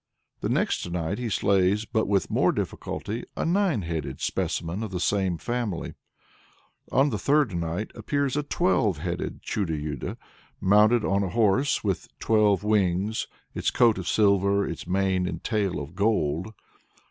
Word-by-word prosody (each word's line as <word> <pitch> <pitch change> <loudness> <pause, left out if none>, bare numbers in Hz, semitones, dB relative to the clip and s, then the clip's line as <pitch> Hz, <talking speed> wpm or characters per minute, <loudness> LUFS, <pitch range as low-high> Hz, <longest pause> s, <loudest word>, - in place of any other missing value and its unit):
The - - -2
next - - 0
night 85 +4 -2
he 120 -2 -2
slays, 100 +1 +2
but 110 0 0
with 100 -2 +1
more - - +3
difficulty, 115 +4 -4
a - - -1
nine 175 - +1
headed 80 -3 -4
specimen 85 +5 -2
of 110 - -3
the 90 -1 -4
same 95 -2 +1
family. 120 -4 -3 1.0
On 135 +2 +3
the 105 - -2
third 145 -1 +2
night 85 +5 -3
appears 140 -2 -1
"a 150 - +1
twelve 145 - +1
headed 85 +2 -4
Chudo 90 -7 -1
Yudo," 75 -2 -4 0.4
mounted 105 +4 +4
on 100 +1 +2
a 95 - -1
horse 115 +6 +2
"with 100 -4 -1
twelve 105 -3 +3
wings, 105 0 +1 0.3
its - - 0
coat 115 -5 +3
of 90 - -6
silver, 100 -1 +3
its 85 - -6
mane 95 0 +1
and - - -5
tail 105 -7 0
of 75 +3 -7
gold." 95 -3 0
100 Hz, 155 wpm, -26 LUFS, 90-110 Hz, 1.0 s, mounted